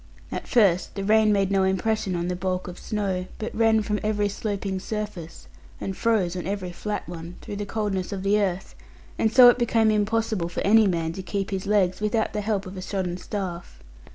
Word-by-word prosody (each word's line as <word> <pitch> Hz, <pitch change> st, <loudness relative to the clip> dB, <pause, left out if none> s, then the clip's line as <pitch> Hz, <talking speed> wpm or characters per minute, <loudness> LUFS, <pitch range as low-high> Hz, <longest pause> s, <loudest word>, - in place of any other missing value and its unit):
At -, -, -5 dB
first 195 Hz, -8 st, +3 dB
the 195 Hz, -, -3 dB
rain 215 Hz, +1 st, +4 dB
made 200 Hz, -1 st, +2 dB
no 195 Hz, -1 st, +3 dB
impression 190 Hz, +1 st, 0 dB
on 175 Hz, 0 st, -2 dB
the 180 Hz, -, -1 dB
bulk 185 Hz, 0 st, -2 dB
of 180 Hz, -, -8 dB
snow, 190 Hz, -4 st, -2 dB
but 220 Hz, -, -5 dB
ran 220 Hz, -1 st, +3 dB
from 210 Hz, 0 st, -1 dB
every 210 Hz, -1 st, 0 dB
sloping 200 Hz, -2 st, -3 dB
surface 205 Hz, -5 st, -6 dB, 0.3 s
and 190 Hz, -, -4 dB
froze 200 Hz, -6 st, +1 dB
on 180 Hz, -1 st, -4 dB
every 190 Hz, -2 st, -3 dB
flat 205 Hz, +2 st, -4 dB
one, 170 Hz, 0 st, -8 dB
through 205 Hz, -, -6 dB
the 205 Hz, 0 st, -4 dB
coldness 205 Hz, -4 st, -2 dB
of 195 Hz, -2 st, -4 dB
the 205 Hz, +2 st, +3 dB
earth; 190 Hz, -1 st, -2 dB, 0.5 s
and 220 Hz, -, +2 dB
so 250 Hz, +1 st, +9 dB
it 245 Hz, -, +3 dB
became 225 Hz, -2 st, +3 dB
impossible 215 Hz, -3 st, 0 dB
for 175 Hz, -, -4 dB
any 215 Hz, +1 st, +5 dB
man 165 Hz, -3 st, -1 dB
to 190 Hz, -, -6 dB
keep 195 Hz, +2 st, -3 dB
his 195 Hz, 0 st, -3 dB
legs 195 Hz, -2 st, +2 dB
without 215 Hz, +1 st, 0 dB
the 210 Hz, -, -1 dB
help 205 Hz, -1 st, -1 dB
of 185 Hz, +1 st, -8 dB
a -, -, -5 dB
shodden 185 Hz, -2 st, -3 dB
staff. 180 Hz, -, -5 dB
200 Hz, 210 wpm, -25 LUFS, 185-215 Hz, 0.5 s, so